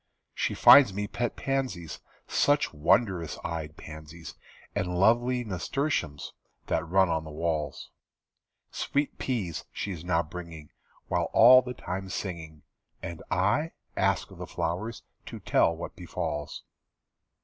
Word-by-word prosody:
She -, -, -1 dB
finds 125 Hz, -9 st, +8 dB
me 105 Hz, 0 st, -1 dB
pet 120 Hz, +3 st, -2 dB
pansies. 130 Hz, -, -3 dB, 0.3 s
Such 145 Hz, -, +2 dB
wondrous 85 Hz, +2 st, +1 dB
eyed 80 Hz, -2 st, -5 dB
pansies, 80 Hz, +1 st, -10 dB, 0.4 s
And 90 Hz, -1 st, -2 dB
lovely 120 Hz, +5 st, +3 dB
nasturtiums 105 Hz, -, -2 dB, 0.3 s
That 80 Hz, +1 st, -1 dB
run 95 Hz, +1 st, +4 dB
on 80 Hz, -1 st, 0 dB
the 80 Hz, -, -9 dB
walls. 75 Hz, -2 st, -3 dB, 0.8 s
Sweet 145 Hz, +1 st, -2 dB
peas 105 Hz, -, -3 dB
she's 90 Hz, -6 st, -5 dB
now 85 Hz, -2 st, +1 dB
bringing, 85 Hz, -2 st, -9 dB, 0.4 s
While -, -, 0 dB
all 125 Hz, +3 st, +9 dB
the 125 Hz, 0 st, -7 dB
time 95 Hz, -1 st, -5 dB
singing. 80 Hz, -6 st, -6 dB, 0.4 s
And 85 Hz, -1 st, -6 dB
I? 105 Hz, -, +1 dB, 0.2 s
Ask -, -, +1 dB
the -, -, -9 dB
flowers 100 Hz, +8 st, -3 dB, 0.2 s
To -, -, -7 dB
tell 85 Hz, -, +2 dB
what 85 Hz, -, -7 dB
befalls. 75 Hz, 0 st, -5 dB
90 Hz, 125 wpm, -28 LUFS, 80-120 Hz, 0.8 s, all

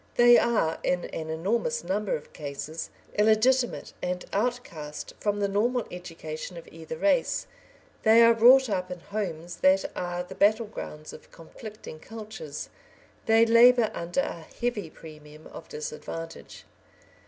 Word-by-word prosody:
They 240 Hz, 0 st, +7 dB
are, 215 Hz, -9 st, +1 dB
in 180 Hz, -1 st, 0 dB
an 160 Hz, 0 st, -6 dB
enormous 225 Hz, -, -1 dB
number 205 Hz, +1 st, -1 dB
of 150 Hz, -, -9 dB
cases, 150 Hz, +2 st, -6 dB, 0.3 s
illegitimate 235 Hz, +4 st, +2 dB
and 180 Hz, 0 st, -3 dB
outcast 195 Hz, -10 st, -3 dB
from 205 Hz, -1 st, -1 dB
the 200 Hz, -, +1 dB
normal 230 Hz, +4 st, 0 dB
education 165 Hz, -1 st, -7 dB
of 170 Hz, -, -10 dB
either 160 Hz, -1 st, -8 dB
race; 275 Hz, -, +1 dB, 0.6 s
they 225 Hz, +1 st, +6 dB
are 230 Hz, 0 st, +7 dB
brought 255 Hz, +4 st, +7 dB
up 185 Hz, -4 st, -2 dB
in 180 Hz, -1 st, -6 dB
homes 175 Hz, -4 st, -5 dB
that 190 Hz, +1 st, +4 dB
are 175 Hz, 0 st, -3 dB
the 180 Hz, -, -10 dB
battle 215 Hz, +3 st, +3 dB
grounds 155 Hz, -7 st, -8 dB
of -, -, -13 dB
conflicting 205 Hz, 0 st, -11 dB
cultures; 210 Hz, -8 st, -8 dB, 0.6 s
they 225 Hz, +1 st, +6 dB
labour 230 Hz, 0 st, +6 dB
under 175 Hz, +10 st, -1 dB
a 170 Hz, -, -5 dB, 0.2 s
heavy 235 Hz, -8 st, -2 dB
premium 155 Hz, -1 st, -13 dB
of 160 Hz, -, -11 dB
disadvantage. 165 Hz, +2 st, -7 dB
195 Hz, 140 wpm, -27 LUFS, 165-230 Hz, 0.6 s, They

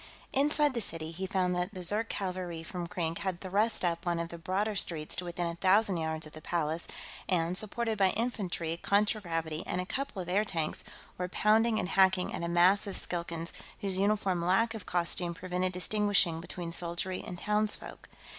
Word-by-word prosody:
Inside 295 Hz, +1 st, +3 dB
the 235 Hz, -, -1 dB
city, 165 Hz, -5 st, -3 dB
he 190 Hz, +3 st, -4 dB
found 180 Hz, -1 st, +1 dB
that 180 Hz, +3 st, -2 dB
the 185 Hz, -, -5 dB
Zirk 210 Hz, +5 st, +1 dB
cavalry 180 Hz, -4 st, -3 dB
from 175 Hz, +1 st, -5 dB
Krink 170 Hz, -3 st, -2 dB
had 185 Hz, -3 st, -2 dB
thrust 200 Hz, +2 st, +1 dB
up 170 Hz, -1 st, 0 dB
one 175 Hz, -1 st, 0 dB
of 170 Hz, 0 st, -3 dB
the 170 Hz, -, -8 dB
broader 195 Hz, +5 st, 0 dB
streets 160 Hz, -6 st, -1 dB
to 180 Hz, -, -2 dB
within 175 Hz, 0 st, -3 dB
a 170 Hz, -, -2 dB
thousand 190 Hz, +2 st, +3 dB
yards 160 Hz, -1 st, -2 dB
of 155 Hz, -, -11 dB
the 155 Hz, -, -10 dB
Palace, 165 Hz, 0 st, 0 dB, 0.4 s
and, 175 Hz, -1 st, +2 dB
supported 220 Hz, +2 st, -1 dB
by 190 Hz, -1 st, +5 dB
infantry, 185 Hz, -8 st, -2 dB
contragravity, 170 Hz, -6 st, 0 dB
and -, -, -1 dB
a 180 Hz, -, -2 dB
couple 265 Hz, -1 st, -3 dB
of 180 Hz, -, -4 dB
airtanks, 180 Hz, -4 st, 0 dB, 0.4 s
were 180 Hz, 0 st, -2 dB
pounding 220 Hz, +3 st, +3 dB
and 180 Hz, -, -1 dB
hacking 190 Hz, -1 st, +3 dB
at -, -, -3 dB
a 170 Hz, -, -1 dB
mass 180 Hz, +4 st, +5 dB
of 195 Hz, -, -1 dB
Skilkans 170 Hz, -1 st, -1 dB, 0.3 s
whose 190 Hz, -2 st, 0 dB
uniform 200 Hz, -3 st, +1 dB
lack 195 Hz, +6 st, +3 dB
of 220 Hz, -4 st, -8 dB
costume 175 Hz, 0 st, 0 dB
prevented 180 Hz, +1 st, -1 dB
distinguishing 185 Hz, -3 st, +2 dB
between 175 Hz, 0 st, -5 dB
soldiery 175 Hz, +2 st, -2 dB
and 175 Hz, -, -6 dB
townsfolk. 210 Hz, +3 st, -1 dB
180 Hz, 185 wpm, -31 LUFS, 170-205 Hz, 0.4 s, by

